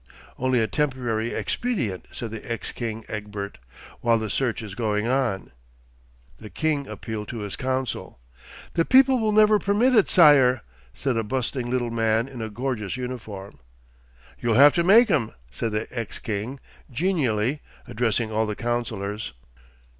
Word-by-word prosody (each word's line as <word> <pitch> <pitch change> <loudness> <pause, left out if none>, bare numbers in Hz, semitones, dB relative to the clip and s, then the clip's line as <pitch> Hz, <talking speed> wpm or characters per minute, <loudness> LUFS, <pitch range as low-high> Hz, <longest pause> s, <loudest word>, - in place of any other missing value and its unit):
'Only 130 -1 +2
a 110 - +2
temporary 120 -3 -1
expedient,' 130 - -2
said 115 -2 -6
the 110 +1 -7
ex 115 - -3
king 115 -2 -5
Egbert, 105 -1 -6 0.4
'while 115 -1 +3
the 110 -2 -3
search 120 0 -1
is 105 -3 -7
going 105 0 -1
on.' 125 -6 0 0.9
The 110 - -10
king 145 - -1
appealed 110 -3 -6
to 115 - -5
his 105 -1 -4
council. 130 - -3 0.6
'The 165 -1 +2
people 265 0 +5
will 220 -1 +1
never 215 0 +5
permit 210 +7 +2
it, 215 -5 +4
sire,' 135 -7 +6 0.3
said 125 - -1
a 115 - +1
bustling 125 +1 -2
little 120 -2 -1
man 115 +1 +1
in 130 -4 -8
a 110 - -3
gorgeous 120 -1 -3
uniform. 110 - -7 0.8
'You'll 115 -2 +1
have 140 +4 +8
to 170 - +2
make 215 +5 +6
'em,' 130 -9 +1 0.2
said 115 - -3
the 110 +1 -1
ex 115 -4 -4
king, 110 +5 -4 0.3
genially 135 - 0 0.3
addressing 115 -2 0
all 110 0 +1
the 105 - -3
councillors. 110 - -3
120 Hz, 155 wpm, -24 LUFS, 110-135 Hz, 0.9 s, have